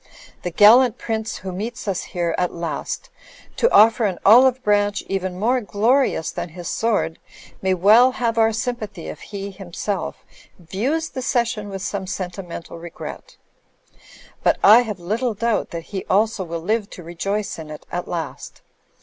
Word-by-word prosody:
The 180 - -3
gallant 225 +7 +6
prince 220 -1 -3
who 190 0 -6
meets 225 +6 -5
us 190 -3 -2
here 170 -2 -2
at 180 - 0
last, 170 - -5 0.4
to 475 - +2
offer 225 +1 +6
an 190 -4 -1
olive 255 +4 +6
branch 205 -1 +1
even 185 -2 -3
more 245 +5 +2
glorious 220 - +1
than - - -5
his 175 +1 -8
sword, 215 -8 0 0.4
may 190 -1 +1
well 220 +8 +6
have 235 -2 -1
our 225 0 +5
S3mipathy 220 -5 -4
if - - -12
he 200 -1 -6
himself 195 +1 -5 0.3
views 240 - -2
the 260 - -5
cession 235 -4 -1
with 195 -1 -6
some 195 -1 -3
sentimental 180 -2 -6
regret; 170 0 -9 1.0
but - - +3
I 220 +4 +9
have 215 -6 -5
little 220 +6 -2
doubt 230 +1 0
that 170 -1 -6
he 190 - -3
also 210 0 +1
will 170 -1 -5
live 210 +3 -1
to 180 - -9
rejoice 195 +4 -3
in 155 -1 -8
it 150 - -9
at 175 0 -3
last. 170 -2 -6
205 Hz, 160 wpm, -21 LUFS, 180-230 Hz, 1.0 s, I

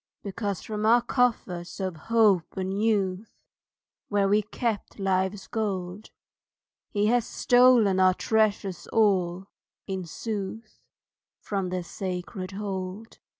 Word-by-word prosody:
Because 200 -2 -3
from 210 -1 -4
our 235 +2 +5
coffers 220 -9 -1
of 185 -3 -2
hope 205 0 +2
and 190 +2 -2
youth, 205 -2 0 0.7
Where 205 -1 +2
we 205 +2 +3
kept 215 +1 -3
life's 190 0 0
gold, 200 -3 -3 0.8
He 205 -1 0
has 240 +2 +3
stolen 245 -6 +4
our 185 -1 +5
treasures 210 -4 0
all, 190 -4 +2 0.4
in 190 -2 -4
sooth, 215 +4 -6 0.6
From 195 -3 -3
their 180 0 -3
sacred 185 +1 -5
hold. 195 +1 -5
200 Hz, 110 wpm, -27 LUFS, 185-220 Hz, 0.8 s, our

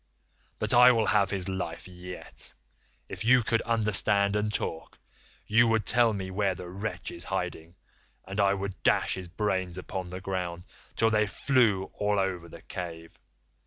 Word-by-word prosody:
But - - -2
I 125 +1 +9
will 115 -3 +2
have 100 -2 +3
his 95 -3 -2
life 95 -3 -4
yet. 90 0 -8 0.5
If - - -6
you 125 +1 +5
could 115 +1 +1
understand 105 -3 +1
and 105 0 0
talk, 80 -5 -4 0.5
you 115 +2 +4
would 110 -2 +2
tell 120 -1 +4
me 95 -3 -4
where 95 -1 0
the 90 0 -8
wretch 100 +4 -5
is - - -7
hiding, 80 +2 -4 0.5
and 100 +2 -5
I 100 0 +4
would 100 -1 -5
dash - - +3
his 95 -1 -5
brains 95 -1 -1
upon 90 0 -5
the 90 +1 -6
ground 90 -2 -3 0.3
till 115 0 +3
they 105 0 +3
flew 110 -5 +2
all 105 0 0
over 95 -3 -1
the - - -12
cave. 85 -2 -7
100 Hz, 165 wpm, -28 LUFS, 90-105 Hz, 0.5 s, I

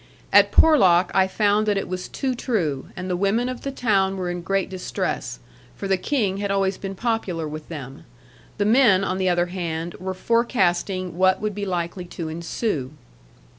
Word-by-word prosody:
At - - +6
Porlock 190 - +5
I 190 0 +4
found 210 +2 +1
that 205 -1 +2
it 195 - -2
was 185 0 -4
too 265 -2 -2
true; 175 - -2
and 185 0 -5
the 180 - -1
women 200 +6 +1
of 255 -1 -5
the 275 - -3
town 195 -7 +1
were 180 -1 -2
in 175 0 -4
great 195 +2 0
distress, 185 - -3 0.4
for 200 - -5
the 195 - +3
King 195 -1 -1
had 200 0 -2
always 195 -1 +1
been 195 0 -5
popular 190 -7 -2
with 155 0 -8
them: 145 0 -8 0.5
the 205 - +1
men, 220 -4 +5
on 185 -1 -1
the 185 -1 +2
other 175 0 +2
hand, 170 -2 -3
were 185 +1 -4
forecasting 185 -5 0
what 185 0 +4
would 215 0 -2
be 200 0 -4
likely 175 0 -3
to 170 -2 -6
ensue. 160 - -3
190 Hz, 185 wpm, -23 LUFS, 175-205 Hz, 0.5 s, At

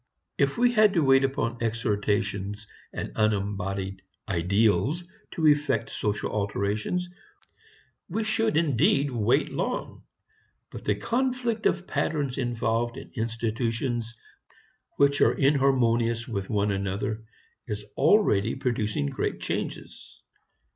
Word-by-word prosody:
If - - +2
we 245 0 +4
had 215 -4 +4
to 165 - +3
wait 135 0 +5
upon 120 -4 -1
exhortations 105 -3 -1 0.3
and - - -5
unembodied 100 -2 -1 0.3
"ideals" 100 - +2 0.3
to 160 - 0
effect 145 -6 +2
social 105 -1 -2
alterations, 105 - -1 1.0
we 220 +6 -1
should 220 -2 +1
indeed 140 -2 +2
wait 115 -4 +1
long. - - -3 0.7
But - - -9
the - - +2
conflict 245 -3 0
of 185 0 -1
patterns 145 -8 -1
involved 120 -1 -1
in - - -10
institutions 115 0 -2 0.8
which 140 0 +3
are - - +5
inharmonious 120 -4 +2
with 100 -5 -4
one 105 -1 +1
another 100 +3 -2 0.4
is 105 -2 -4
already 135 - +3
producing 105 - -1
great 70 - -2
changes. - - -5
115 Hz, 110 wpm, -27 LUFS, 105-145 Hz, 1.0 s, wait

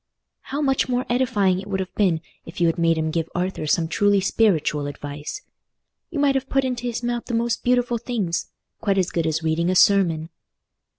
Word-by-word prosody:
"How 285 +2 -4
much 270 -1 +1
more 250 0 0
edifying 210 -7 +2
it 195 - -11
would 195 -1 -2
have 190 -1 -4
been 180 -6 +1 0.2
if 165 +3 -10
you 175 - +3
had 165 +1 +1
made 165 -1 +3
him 160 0 -1
give 165 0 -2
Arthur 180 -3 -2
some 165 +2 +2
truly 205 +4 +3
spiritual 170 -8 +1
advice! 145 - -7 0.7
You 330 - -5
might 285 -1 +3
have 270 0 -2
put 270 -1 +2
into 245 -1 -2
his 240 0 -3
mouth 240 0 -2
the 235 - -3
most 230 0 0
beautiful 245 -1 +2
things—quite 200 -2 -3
as 185 -1 +1
good 165 -2 0
as 160 +1 -1
reading 160 +2 +1
a 185 - +1
sermon." 170 -5 +4
195 Hz, 195 wpm, -23 LUFS, 165-240 Hz, 0.7 s, sermon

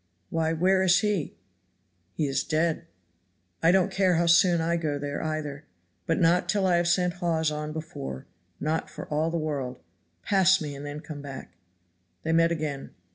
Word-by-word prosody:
"Why 160 -1 0
where 185 +4 +3
is 185 +1 +4
he?" 205 - -1 0.8
"He 155 - 0
is 135 0 0
dead." 165 +1 0 0.7
"I 165 - +5
don't 190 +1 +3
care 190 -2 +2
how 170 +1 +2
soon 170 +1 +5
I 165 +1 +1
go 155 -4 -1
there 145 0 -4
either, 155 -2 -4 0.4
but - - +1
not 175 +1 +3
till 200 -2 +2
I 180 -2 +3
have 175 0 +1
sent 180 0 +2
Hawes 160 -3 +1
on 150 0 -4
before 155 - -6 0.3
not 155 +2 -1
for - - -8
all 155 +2 0
the 170 - -2
world. 145 - -3 0.4
Pass 190 -1 +4
me, 150 -2 -5
and 140 0 -8
then 145 +1 -6
come 150 -3 -8
back." 135 -8 -8 0.7
They 160 - -1
met 165 +1 +4
again. 150 -4 -4
160 Hz, 180 wpm, -27 LUFS, 150-175 Hz, 0.8 s, I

